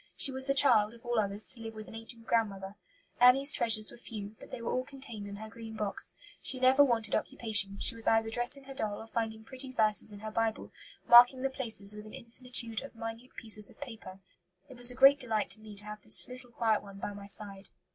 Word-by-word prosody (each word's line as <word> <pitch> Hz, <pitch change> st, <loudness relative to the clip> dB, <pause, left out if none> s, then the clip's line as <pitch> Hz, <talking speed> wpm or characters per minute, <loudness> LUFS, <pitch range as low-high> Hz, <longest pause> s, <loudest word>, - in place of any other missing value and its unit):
She 275 Hz, -, +5 dB
was 265 Hz, 0 st, -1 dB
the 275 Hz, -, 0 dB
child, 235 Hz, -5 st, +4 dB
of 235 Hz, -, -20 dB
all 240 Hz, -1 st, -1 dB
others, 205 Hz, 0 st, +1 dB
to 235 Hz, -, 0 dB
live 225 Hz, 0 st, -8 dB
with 215 Hz, 0 st, -10 dB
an -, -, -13 dB
ancient 225 Hz, +1 st, -11 dB
grandmother. 200 Hz, -4 st, -2 dB, 0.5 s
Annie's 265 Hz, +3 st, +6 dB
treasures 215 Hz, -2 st, +3 dB
were -, -, -15 dB
few, 215 Hz, -3 st, -9 dB
but -, -, -14 dB
they -, -, -8 dB
were 230 Hz, -, -4 dB
all 255 Hz, -, -1 dB
contained 255 Hz, -7 st, -8 dB
in 200 Hz, -, -8 dB
her 220 Hz, +2 st, -9 dB
green 225 Hz, 0 st, -11 dB
box. 210 Hz, -2 st, 0 dB, 0.3 s
She 260 Hz, -, +1 dB
never 260 Hz, +2 st, +5 dB
wanted 230 Hz, -5 st, -1 dB
occupation; 210 Hz, -3 st, +2 dB
she -, -, +2 dB
was 230 Hz, -1 st, -2 dB
either 225 Hz, 0 st, +1 dB
dressing 245 Hz, +4 st, -3 dB
her 270 Hz, 0 st, -11 dB
doll 215 Hz, -6 st, -4 dB
or -, -, -10 dB
finding 225 Hz, -1 st, -5 dB
pretty 260 Hz, +2 st, -3 dB
verses 215 Hz, -3 st, +5 dB
in 205 Hz, 0 st, -11 dB
her 215 Hz, 0 st, -7 dB
Bible, 225 Hz, 0 st, -3 dB, 0.4 s
marking 245 Hz, +2 st, +7 dB
the 270 Hz, -, -1 dB
places 220 Hz, -6 st, -1 dB
with 210 Hz, 0 st, -10 dB
an 215 Hz, -, -11 dB
infinitude 235 Hz, -1 st, -3 dB
of 275 Hz, -3 st, -12 dB
minute 225 Hz, +2 st, -9 dB
pieces 215 Hz, -2 st, -3 dB
of -, -, -21 dB
paper. 225 Hz, -8 st, -10 dB, 0.5 s
It 260 Hz, -, -12 dB
was 245 Hz, 0 st, +4 dB
a 250 Hz, -, -4 dB
great 275 Hz, +2 st, +6 dB
delight 220 Hz, -5 st, -2 dB
to 215 Hz, -, -1 dB
me 215 Hz, -1 st, -12 dB
to 205 Hz, +1 st, -1 dB
have 210 Hz, 0 st, -9 dB
this 215 Hz, -, +1 dB
little 250 Hz, 0 st, -12 dB
quiet 225 Hz, -2 st, 0 dB
one 200 Hz, -1 st, -13 dB
by 205 Hz, +1 st, -6 dB
my 200 Hz, 0 st, -11 dB
side. 200 Hz, -1 st, -8 dB
225 Hz, 235 wpm, -30 LUFS, 210-250 Hz, 0.5 s, marking